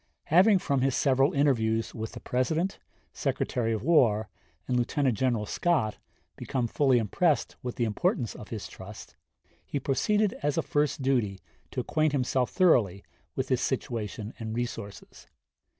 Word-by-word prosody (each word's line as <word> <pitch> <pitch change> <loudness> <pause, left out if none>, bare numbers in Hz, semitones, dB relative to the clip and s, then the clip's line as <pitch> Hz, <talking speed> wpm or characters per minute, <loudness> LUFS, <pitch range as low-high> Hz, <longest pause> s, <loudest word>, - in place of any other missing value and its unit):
Having 195 +4 +7
from 140 -7 0
his 135 -1 +1
several 135 0 +3
interviews 115 -6 +1
with 110 0 -5
the - - -7
President, 160 +9 -1 0.3
Secretary 115 -2 -1
of 110 -2 -2
War, 115 -9 +3 0.4
and 125 - 0
Lieutenant 125 +1 +1
General 120 -2 0
Scott 135 -4 0 0.4
become 125 -2 -2
fully 130 +2 +3
impressed 145 - +1
with 125 -2 -5
the 120 - -1
importance 110 +2 0
of 105 - -10
his 110 -3 -5
trust, 100 +3 -11 0.5
he 145 - -3
proceeded 205 +10 +1
as 145 0 0
a 165 - +2
first 145 -2 0
duty 115 -8 +1 0.3
to - - -3
acquaint 155 +4 0
himself 130 -2 +1
thoroughly 115 - +3 0.3
with 130 0 -2
his 130 -1 +1
situation 115 -4 -3
and 110 -1 -4
resources. 115 -4 -6
125 Hz, 150 wpm, -28 LUFS, 110-145 Hz, 0.5 s, Having